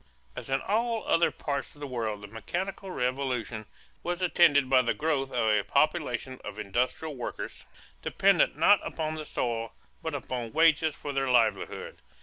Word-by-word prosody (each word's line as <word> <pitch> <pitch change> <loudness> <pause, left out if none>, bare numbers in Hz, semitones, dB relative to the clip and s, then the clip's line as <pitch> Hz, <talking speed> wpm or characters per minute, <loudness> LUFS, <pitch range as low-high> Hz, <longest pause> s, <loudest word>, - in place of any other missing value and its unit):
As - - -7
in 135 0 +1
all 225 +2 0
other 170 - +4
parts 140 -1 -4
of - - -17
the 145 - -5
world, 110 -6 -3
the - - -7
mechanical 175 - -4
revolution 125 - -2 0.3
was 175 0 -2
attended 170 -6 +4
by 130 0 +5
the 120 - 0
growth 145 -3 0
of 115 -3 +1
a 105 -1 +3
population 140 - 0
of - - -7
industrial 125 +9 -1
workers 125 - -6 0.3
dependent - - +3
not - - +6
upon 155 -1 -3
the 155 -1 -5
soil 115 -4 -2 0.3
but 160 -2 -3
upon 125 -4 -4
wages 160 -1 +4
for 145 - -6
their 135 -1 0
livelihood. 120 -2 +1
135 Hz, 160 wpm, -28 LUFS, 120-160 Hz, 0.3 s, not